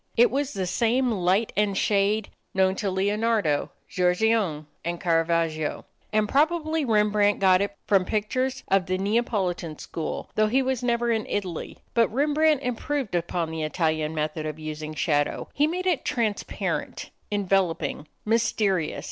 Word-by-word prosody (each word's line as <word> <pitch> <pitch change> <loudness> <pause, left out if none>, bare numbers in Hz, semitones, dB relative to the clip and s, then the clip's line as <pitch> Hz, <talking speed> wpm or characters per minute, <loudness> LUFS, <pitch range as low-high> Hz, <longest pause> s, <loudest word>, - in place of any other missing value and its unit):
It 240 +1 +6
was 280 +1 -1
the 190 -1 -2
same 235 +7 +1
light 195 +2 +1
and 205 -1 +1
shade 205 +1 +1 0.3
known 190 0 +3
to 205 - -1
Leonardo, 205 -4 +1 0.2
Giorgione, 180 -3 +1 0.2
and 170 0 -3
Carravagio, 165 -3 0 0.3
and 215 0 +2
probably 315 +3 +1
Rembrandt 210 -3 +3
got 185 -1 +5
it 200 0 -3
from 195 -2 +3
pictures 255 +6 -1
of 195 -1 +2
the 185 0 0
Neapolitan 190 -6 -1
School, 160 - -5
though 215 0 +3
he 260 +5 +2 0.2
never 240 -1 +1
was 230 - +3
in 220 - -6
Italy. 185 -5 -4 0.2
But 230 -1 +3
Rembrandt 295 +2 +2
improved 250 0 -2
upon 170 -1 -1
the 160 0 -4
Italian 155 0 -1
method 155 0 -2
of 155 0 -5
using 155 0 -6
shadow. 145 -3 0
He 295 +2 +3
made 360 +3 -3
it 355 -7 +1
transparent, 220 -4 -2 0.2
enveloping, 190 -6 0 0.2
mysterious. 210 -6 +1
200 Hz, 145 wpm, -25 LUFS, 170-235 Hz, 0.3 s, It